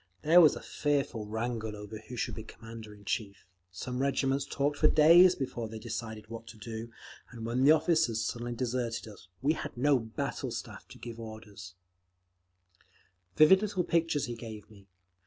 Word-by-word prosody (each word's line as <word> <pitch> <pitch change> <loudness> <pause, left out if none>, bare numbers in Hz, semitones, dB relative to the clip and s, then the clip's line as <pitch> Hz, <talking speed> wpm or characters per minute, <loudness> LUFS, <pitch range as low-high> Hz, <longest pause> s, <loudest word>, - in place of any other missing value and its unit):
There 170 +4 +7
was 155 - +6
a - - -8
fearful 140 -7 -1
wrangle 110 0 -3
over 105 +1 -8
who 115 +3 -10
should - - -2
be 110 - -6
Commander 115 0 -10
in 100 -1 -15
chief; 100 -1 -3 0.3
some 125 +8 -5
regiments 135 0 +1
talked 145 +1 -1
for 155 - +6
days 170 +5 +7
before 120 -4 -4
they 110 - -7
decided 110 -1 -6
what 115 0 -8
to 115 - -11
do; 110 +1 -6 0.4
and 115 -2 -8
when 120 +3 0
the 145 - +7
officers 155 -8 +2
suddenly 120 0 -3
deserted 120 -2 -2
us, 100 -3 -13 0.2
we 150 +3 +4
had 150 - -6
no 140 +1 +4
battle 110 -1 -4
staff - - -7
to - - -13
give 115 -1 -8
orders…." 110 -4 -10 1.6
Vivid 190 +6 +7
little 200 -4 -1
pictures 165 -4 +1
he 120 - -5
gave 110 -2 -9
me. 100 -2 -17
115 Hz, 175 wpm, -30 LUFS, 110-140 Hz, 1.6 s, There